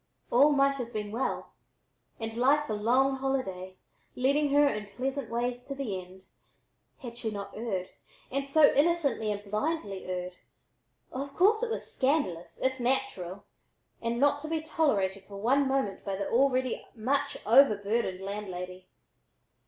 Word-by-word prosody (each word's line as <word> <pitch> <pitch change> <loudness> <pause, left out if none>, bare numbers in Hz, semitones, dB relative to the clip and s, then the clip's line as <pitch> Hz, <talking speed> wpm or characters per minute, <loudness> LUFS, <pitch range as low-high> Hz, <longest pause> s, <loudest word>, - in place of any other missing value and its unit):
All 280 +5 +6
might 275 -1 +3
have 240 -2 -5
been 210 -2 -4
well, 235 +5 -3 0.7
and 225 -1 -4
life 280 +5 +3
a - - 0
long 255 +6 +2
holiday, 190 -9 -3 0.4
leading 280 +3 +2
her 290 +1 +5
in 210 -6 -2
pleasant 260 +4 -3
ways 245 +1 -2
to 275 - -5
the 215 -9 -3
end, 185 +1 -16 0.8
had 240 -3 -7
she 235 -2 -3
not 200 -1 -6
erred, 195 -5 -3 0.4
and 275 +1 -1
so 290 +1 +6
innocently 285 -8 +2
and 205 0 -4
blindly 210 - -2
erred. 180 0 -4 0.7
Of 275 +2 -5
course 430 +4 +4
it - - 0
was 455 - -3
scandalous, 260 - 0
if 260 0 +1
natural, 240 -8 -2 0.6
and 235 +1 -1
not 285 +1 +3
to 310 - -5
be 320 0 -1
tolerated 200 -12 0
for 200 0 -10
one 265 +7 +2
moment 265 -7 -1
by 195 -1 -2
the 200 0 -3
already 255 0 +2
much 255 +5 0
overburdened 215 -5 +4
landlady. 185 -2 -6
245 Hz, 150 wpm, -29 LUFS, 200-275 Hz, 0.8 s, All